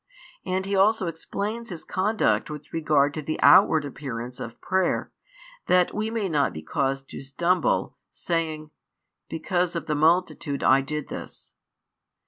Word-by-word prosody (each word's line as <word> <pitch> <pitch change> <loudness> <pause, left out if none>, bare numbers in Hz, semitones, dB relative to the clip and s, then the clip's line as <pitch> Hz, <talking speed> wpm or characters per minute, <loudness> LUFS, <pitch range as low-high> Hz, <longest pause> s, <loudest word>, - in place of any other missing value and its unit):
And 190 +1 -2
He 200 0 -1
also 205 +1 +3
explains 205 +7 -4
His 175 -4 -7
conduct 205 0 0
with 150 0 -9
regard 150 -3 +2
to 155 - -4
the 155 +2 -4
outward 155 -2 +6
appearance 125 -3 -6
of 115 0 -7
prayer, 190 -1 0 0.6
that 180 -1 +3
we 215 +1 -2
may 225 -3 -1
not 150 -5 +1
be 80 - -7
caused 135 - -1
to - - -7
stumble, 170 +5 0
saying: 155 -2 -3 0.6
because 175 +2 -1
of 170 - -3
the 155 - -1
multitude 155 -2 +1
I 135 +1 +5
did 150 +2 -4
this. - - -9
160 Hz, 145 wpm, -25 LUFS, 145-185 Hz, 0.6 s, outward